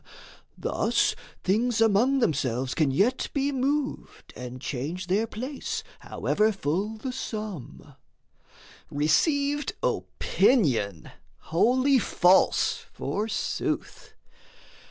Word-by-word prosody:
Thus - - +1 0.3
things 225 +5 +1
among 225 +5 +3
themselves 130 - 0
can 155 -4 +2
yet 205 - +1
be 280 0 +1
moved, 275 +2 -2
And 125 0 -7
change 150 +8 -4
their 200 +5 +1
place, 255 +6 -5 0.2
however 215 +1 0
full 195 +4 -2
the 255 +4 -4
Sum 200 - -6 1.0
Received 280 - +1
opinion, 120 - +1 0.4
wholly 255 +9 +4
false 185 -3 +3
forsooth. 215 +2 -3
215 Hz, 85 wpm, -26 LUFS, -, 1.0 s, wholly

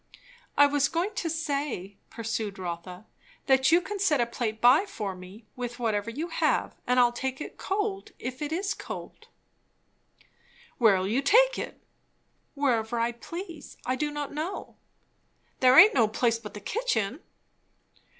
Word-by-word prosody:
"I 285 - +8
was 285 -1 +2
going 360 +6 -1
to 360 -5 -2
say," 285 - -3
pursued 225 -3 -4
Rotha, 180 +2 -6 0.4
"that 265 +1 +4
you 340 - +7
can 405 +2 -5
set 360 -7 +3
by 240 0 -1
a 215 - -2
plate 255 - +5
for 205 - -4
me 185 +5 -12
with 245 -1 -5
whatever 220 -3 -1
you 305 +9 -4
have, - - 0
and 250 0 +3
I'll 240 -1 +5
take 260 +2 -4
it - - -8
cold 395 0 -2
if 255 +3 -6
it 295 0 -3
is 385 +4 -1
cold." - - -9 1.5
"Where'll 195 -6 +4
you 235 +7 +1
take - - +4
it?" - - -7 0.7
"Wherever 240 -5 0
I 230 +1 +1
please. 335 +6 -9
I 255 - 0
do 300 +2 -1
not 295 -1 -5
know." 320 +6 -5 0.8
"There 255 +1 +6
aint 420 +3 +10
no 230 -4 +4
place 230 +1 +1
but 210 -2 -10
the 210 - -7
kitchen." 290 - -1
260 Hz, 155 wpm, -27 LUFS, 225-320 Hz, 1.5 s, aint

